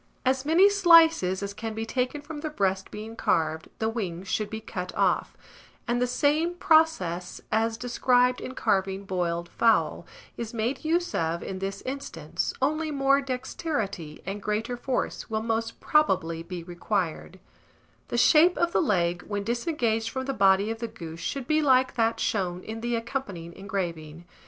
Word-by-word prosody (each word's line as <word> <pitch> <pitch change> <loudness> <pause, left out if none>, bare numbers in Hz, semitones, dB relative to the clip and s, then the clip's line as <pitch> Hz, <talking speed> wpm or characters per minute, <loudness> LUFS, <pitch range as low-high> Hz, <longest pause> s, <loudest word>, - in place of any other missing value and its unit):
As 260 +1 +1
many 335 +6 +6
slices 330 - +5
as 200 0 -4
can 220 +1 -5
be 225 0 -3
taken 255 +5 -2
from 295 +1 -8
the 310 +1 -3
breast 195 -8 -1
being 220 +2 -8
carved, 160 -5 0
the 220 - -1
wings 190 -5 -4
should 215 +1 -1
be 220 - -5
cut 180 -4 -5
off; - - +1 0.5
and 240 +1 0
the 250 - +2
same 295 +7 +1
process 315 - +2
as 225 +1 +1
described 250 +1 +2
in 255 - -6
carving 195 -2 0
boiled 175 -2 -2
fowl, 225 +5 +1 0.3
is 235 0 -5
made 235 +6 -1
use 340 +3 0
of 165 +1 -1
in 190 -1 -5
this 195 +1 -4
instance, 255 - -4
only 310 +3 +1
more 275 -1 +3
dexterity 250 - -4
and 195 +2 -4
greater 215 +4 -2
force 250 0 -3
will 220 0 -1
most 225 0 -2
probably 180 - +2
be 175 0 -7
required: 180 0 -3 0.7
the 240 - -2
shape 325 +8 +6
of 345 0 +1
the - - +2
leg, 175 - +1
when 205 -1 -2
disengaged 235 -1 0
from 260 +3 -4
the 275 - -2
body 195 0 +4
of 225 - -5
the 235 - -3
goose, 165 -7 -9
should 270 +8 -3
be 310 +3 +2
like 260 -3 +4
that 230 -1 +1
shown 180 -3 -1
in 225 +1 -6
the 240 0 -1
accompanying 230 -8 -4
engraving. 170 -5 -5
225 Hz, 165 wpm, -27 LUFS, 190-265 Hz, 0.7 s, many